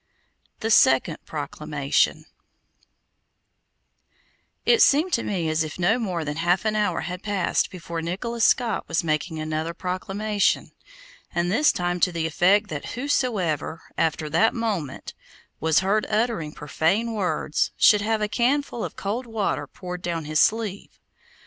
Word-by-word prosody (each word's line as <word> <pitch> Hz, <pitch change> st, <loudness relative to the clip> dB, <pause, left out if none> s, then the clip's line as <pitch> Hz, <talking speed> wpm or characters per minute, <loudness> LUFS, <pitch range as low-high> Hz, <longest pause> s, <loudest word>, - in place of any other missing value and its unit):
THE 225 Hz, 0 st, -1 dB
SECOND -, -, +4 dB
PROCLAMATION -, -, -1 dB, 2.4 s
It 470 Hz, -2 st, +5 dB
seemed 315 Hz, +6 st, +4 dB
to 230 Hz, -, +2 dB
me 180 Hz, -5 st, -2 dB
as 155 Hz, 0 st, +1 dB
if 155 Hz, -1 st, -7 dB
no 190 Hz, +7 st, +2 dB
more 180 Hz, -8 st, -2 dB
than 150 Hz, +1 st, -4 dB
half 175 Hz, +4 st, +1 dB
an 215 Hz, 0 st, +1 dB
hour 205 Hz, -5 st, 0 dB
had 180 Hz, 0 st, -5 dB
passed 200 Hz, -4 st, 0 dB
before 170 Hz, -3 st, -6 dB
Nicholas 220 Hz, +8 st, -3 dB
Skot 240 Hz, -1 st, +2 dB
was 165 Hz, 0 st, 0 dB
making 160 Hz, +1 st, -1 dB
another 155 Hz, +2 st, -3 dB
proclamation, 195 Hz, +3 st, -1 dB, 0.6 s
and 175 Hz, +1 st, +1 dB
this 290 Hz, +9 st, +4 dB
time 175 Hz, 0 st, -2 dB
to 180 Hz, -, +3 dB
the 165 Hz, -2 st, -2 dB
effect 190 Hz, +6 st, +3 dB
that -, -, -5 dB
whosoever, 215 Hz, -, -1 dB
after 160 Hz, -1 st, 0 dB
that 165 Hz, +9 st, +2 dB
moment, 200 Hz, -, -3 dB, 0.5 s
was 160 Hz, +1 st, +3 dB
heard 205 Hz, +3 st, +1 dB
uttering 215 Hz, -8 st, 0 dB
profane 180 Hz, +11 st, 0 dB
words, 185 Hz, -7 st, 0 dB
should 210 Hz, -1 st, +6 dB
have 220 Hz, +1 st, 0 dB
a -, -, +1 dB
can 255 Hz, +6 st, +2 dB
full 240 Hz, -4 st, -6 dB
of -, -, -5 dB
cold 230 Hz, +6 st, -3 dB
water 220 Hz, -3 st, -2 dB
poured 180 Hz, -1 st, -7 dB
down 170 Hz, -3 st, -3 dB
his 155 Hz, 0 st, 0 dB
sleeve. 215 Hz, -3 st, 0 dB
185 Hz, 145 wpm, -24 LUFS, 165-220 Hz, 2.4 s, should